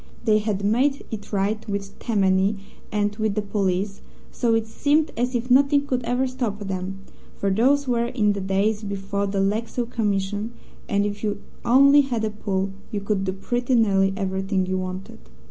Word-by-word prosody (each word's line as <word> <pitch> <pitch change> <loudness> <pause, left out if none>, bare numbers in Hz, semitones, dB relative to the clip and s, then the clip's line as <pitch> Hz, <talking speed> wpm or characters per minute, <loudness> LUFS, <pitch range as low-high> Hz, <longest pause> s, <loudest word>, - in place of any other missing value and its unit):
They 215 -2 +4
had 205 -2 -2
made 265 +7 +2
it 215 -2 -6
right 205 +2 0
with 200 -1 -4
Tammany 195 -2 +2 0.4
and 205 0 0
with 215 -2 0
the 215 - +1
police, 195 -1 -1 0.3
so 230 -2 +1
it 225 -1 +1
seemed 295 +7 +1
as 245 +2 -1
if 245 +1 -2
nothing 280 +2 +5
could 255 -3 -1
ever 245 +3 +1
stop 250 -5 -2
them, 195 -1 -4 0.4
for 200 - 0
those 270 +7 +3
were 235 -1 +1
in 215 -4 +1
the 200 - -4
days 200 +3 +1
before 200 -1 -2
the 195 0 -1
Lexow 225 +4 -1
Commission, 205 -1 -1 0.4
and 200 -1 +2
if 205 +1 -4
you 210 -1 -1 0.2
only 275 +4 +6
had 240 -5 -1
a 215 - -2
pull, 195 -2 -2 0.2
you 210 - -2
could 200 -1 -1
do 190 - 0
pretty 245 +6 -1
nearly 195 -4 +3
everything 190 -1 -1
you 185 0 -1
wanted. 185 - -6
210 Hz, 180 wpm, -24 LUFS, 195-235 Hz, 0.4 s, only